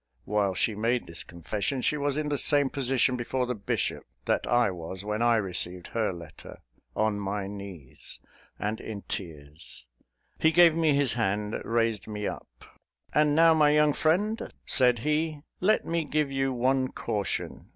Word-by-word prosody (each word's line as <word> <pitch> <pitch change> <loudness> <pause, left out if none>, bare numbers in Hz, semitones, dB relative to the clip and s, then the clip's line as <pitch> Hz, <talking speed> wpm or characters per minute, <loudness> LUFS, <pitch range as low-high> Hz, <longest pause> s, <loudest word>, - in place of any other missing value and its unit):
While 100 -2 0
she 110 - +1
made 115 +4 0
this 85 - -3
confession, 105 - -3
she - - +2
was 145 -1 -1
in 155 -1 -1
the 145 - 0
same 145 -2 +2
position 130 -1 +1
before 125 +1 -1
the 125 - -2
bishop, 105 -4 -2 0.2
that - - 0
I 120 -4 +3
was 90 +3 -7
when 105 +1 -2
I 120 0 +4
received 90 -3 0
her 110 -3 0
letter 85 -3 -11 0.4
on 110 -1 +1
my 100 0 -3
knees, 100 -8 -9 0.4
and 105 +2 -2
in 105 -2 -7
tears. 75 -5 -7 0.5
He 160 - +4
gave 170 -1 +6
me 160 -3 +3
his 140 -3 +2
hand, 105 -2 -1
raised 115 -3 0
me 105 -1 -4
up, - - -6 0.7
"And, 150 -1 +3
now, 165 +1 +6
my 150 -2 +4
young 150 0 +4
friend," 205 +10 0
said 125 -2 +3
he, 155 +1 0 0.2
"let 210 +4 +2
me 165 -1 -1
give 150 -1 0
you 135 0 0
one 130 +1 +1
caution. 105 -5 -3
120 Hz, 165 wpm, -28 LUFS, 100-145 Hz, 0.7 s, gave